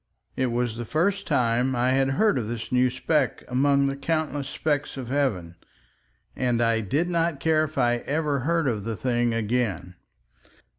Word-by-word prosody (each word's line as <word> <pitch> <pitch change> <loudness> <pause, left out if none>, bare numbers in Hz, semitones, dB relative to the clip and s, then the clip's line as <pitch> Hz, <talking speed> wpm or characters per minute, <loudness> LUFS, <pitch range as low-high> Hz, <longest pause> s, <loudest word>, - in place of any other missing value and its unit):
It 130 - 0
was 120 -1 -1
the 120 - -4
first 195 - 0
time 125 -2 +1
I 125 +1 +1
had 135 +1 +2
heard 215 -11 +3
of 110 - -4
this 115 -1 -5
new 125 0 +3
speck 135 +3 0
among 140 +2 +2
the 135 0 -1
countless 145 -1 -2
specks 145 -1 -2
of 125 -3 -6
heaven, 105 -12 -1 0.8
and 125 -2 0
I 115 -1 +2
did 140 - 0
not 170 -4 0
care 155 +1 +2
if 155 - -10
I 120 0 +1
never 150 -1 0
heard 165 +3 0
of 110 -5 -1
the 115 +1 -3
thing 120 0 0
again. 110 -5 -1
130 Hz, 175 wpm, -25 LUFS, 120-145 Hz, 0.8 s, heard